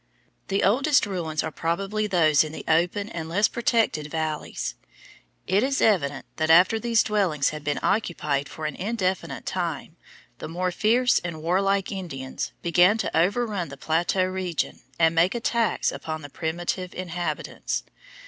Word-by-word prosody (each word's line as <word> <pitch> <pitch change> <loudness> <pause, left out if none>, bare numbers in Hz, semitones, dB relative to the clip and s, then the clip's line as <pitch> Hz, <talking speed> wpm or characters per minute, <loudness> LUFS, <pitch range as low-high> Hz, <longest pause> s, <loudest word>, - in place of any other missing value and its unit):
The 195 0 0
oldest 270 +9 +3
ruins 170 -6 -2
are - - -3
probably 195 +7 -1
those 160 -7 +4
in 155 - -6
the - - -7
open 175 +5 +2
and 165 -7 -6
less 205 +5 +3
protected 225 -10 +1
valleys. 155 - -3 0.7
It 195 +3 +2
is 270 +2 0
evident 145 -10 +2
that 155 0 0
after 180 +7 +6
these 230 -1 +2
dwellings 185 -10 +1
had 155 -1 -7
been 145 -1 -1
occupied 150 -9 0
for 155 - -7
an 155 - -3
indefinite 190 -3 -2
time - - -3 0.4
the - - -5
more 180 +3 -2
fierce 240 +7 +3
and 165 -3 -6
warlike 195 +3 +1
Indians 150 -10 -5
began 180 +5 +4
to 220 - -2
overrun 195 0 +1
the 140 - -9
plateau 170 +5 +1
region 185 -3 -3 0.2
and 165 -1 +4
make 170 +6 +3
attacks 235 -1 +1
upon 155 -1 -5
the 145 - -9
primitive 175 +3 -3
inhabitants. 175 -1 -3
180 Hz, 150 wpm, -25 LUFS, 160-205 Hz, 0.7 s, after